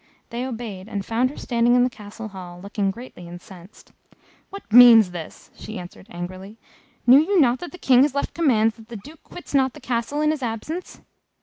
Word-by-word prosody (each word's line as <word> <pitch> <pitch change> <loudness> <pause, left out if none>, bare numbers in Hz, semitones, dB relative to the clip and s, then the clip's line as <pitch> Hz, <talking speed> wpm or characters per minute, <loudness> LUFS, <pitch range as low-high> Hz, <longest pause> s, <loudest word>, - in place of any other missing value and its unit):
They 245 +2 -4
obeyed, 220 -5 -7
and 200 -2 -4
found 240 +3 0
her 290 - -12
standing 240 0 +1
in 245 - +4
the 250 - +1
Castle 215 +1 -10
hall, 180 -3 -10
looking 200 +1 -2
greatly 195 -4 -9
incensed. 175 +2 -14 0.6
"What 395 - -9
means 230 -5 +8
this?" 170 -3 -10
she 215 - -9
asked, 180 -1 -9
angrily. 185 +4 -8 0.5
"Knew 255 +3 +8
you 370 +5 +2
not 250 -4 +3
that 350 - -8
the 360 - -11
King 255 -6 +4
has 280 0 +2
left 280 - -2
commands 225 -9 +1
that 225 -1 -15
the 235 - -7
Duke 295 +10 -14
quits 355 - -12
not 265 -2 +2
the - - -12
Castle 250 +4 -3
in 305 0 +2
his 310 -2 -4
absence?" 250 +10 -6
235 Hz, 200 wpm, -22 LUFS, 200-265 Hz, 0.6 s, means